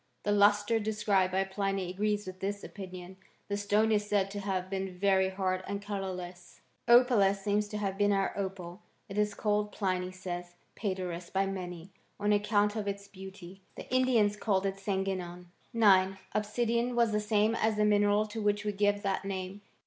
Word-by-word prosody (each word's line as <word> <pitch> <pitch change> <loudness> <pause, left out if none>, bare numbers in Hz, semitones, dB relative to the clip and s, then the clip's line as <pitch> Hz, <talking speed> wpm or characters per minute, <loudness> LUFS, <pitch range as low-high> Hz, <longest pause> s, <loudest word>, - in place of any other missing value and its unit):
The 205 - 0
lustre 205 +2 +4
described 210 -3 +1
by 190 +1 +2
Pliny 195 -1 -2
agrees 210 +2 -1
with 185 0 -8
this 200 +1 -3
opinion. 185 -1 -9 0.3
The 200 - 0
stone 205 +2 +2
is 210 -1 +1
said 195 -1 +1
to 205 - -4
have 190 -2 -2
been 190 -1 -4
very 190 0 +3
hard 185 -1 -1
and 200 0 -3
colourless. 185 -3 -6 0.3
8. 235 - +6
Opalus 200 -6 +2
seems 210 +1 +1
to 210 - -5
have 195 -1 -3
been 205 0 +4
our 195 -1 +1
opal. 190 -1 -5 0.3
It 200 +1 -3
is 210 -1 +1
called, 210 0 0
Pliny 185 -3 -1
says, 175 -1 -6 0.2
pcederos 180 -4 -4
by 195 +1 +1
many, 180 -2 -6 0.3
on 205 0 +2
account 205 0 +2
of 210 -2 -3
its 200 0 -4
beauty. 190 -1 -11
The - - -9
Indians 235 -5 +3
called 195 -3 0
it 195 0 -1
sangenon, 190 -3 -3 0.3
9. 195 -5 +4 0.2
Obsidian 235 +3 0
was 235 -2 +3
the 210 - +1
same 210 +1 +2
as 220 -1 +1
the 210 0 +2
mineral 205 0 +3
to 215 +1 -6
which 205 0 0
we 210 - +1
give 205 0 +1
that 195 -1 -1
name. 195 0 -5
200 Hz, 180 wpm, -30 LUFS, 190-210 Hz, 0.3 s, 8